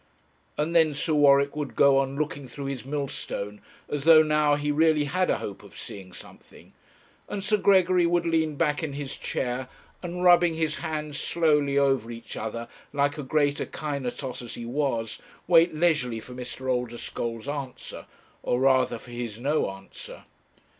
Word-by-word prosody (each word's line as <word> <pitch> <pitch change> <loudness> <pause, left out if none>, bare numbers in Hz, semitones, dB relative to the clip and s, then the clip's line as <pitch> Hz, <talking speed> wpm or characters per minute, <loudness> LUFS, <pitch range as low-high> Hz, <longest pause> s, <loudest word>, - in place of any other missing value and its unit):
And 155 +3 -1
then 160 -3 +4
Sir 155 +2 0
Warwick 140 -1 +4
would 150 -2 -4
go 140 -1 +5
on 135 0 -1
looking 145 -2 -3
through 140 +3 -7
his 135 -2 -4
millstone 135 -7 -4 0.3
as 145 -2 -3
though 160 0 +8
now 150 -1 +3
he 145 0 -1
really 155 0 +3
had 180 +5 0
a - - +2
hope 100 - -7
of - - -14
seeing 95 -2 -8
something, - - -14 0.6
and 195 - -4
Sir 210 +1 +2
Gregory 185 -3 +4
would 170 0 +1
lean 160 -2 +1
back 150 +1 +1
in 155 -3 -3
his 140 -1 -5
chair, 125 0 -3 0.3
and 180 0 -4
rubbing 175 -2 +5
his 160 -1 -1
hands 155 -3 -4
slowly 150 -4 +2
over 135 -5 +2
each 115 0 -8
other, 115 +1 -5 0.2
like 145 +1 0
a - - -1
great 145 +1 +1
Akinetos 135 -3 -4
as 120 - -8
he 120 - -7
was, 120 -4 -2 0.2
wait 170 -1 +5
leisurely 150 -8 +1
for 125 +3 -11
Mr. 125 +1 -7
Oldeschole's 120 -1 -3
answer, 140 -3 -6 0.3
or 125 - 0
rather 130 -1 +3
for 120 - -14
his 120 -3 -5
no 145 +1 +1
answer. 95 0 -11
145 Hz, 165 wpm, -26 LUFS, 125-155 Hz, 0.6 s, though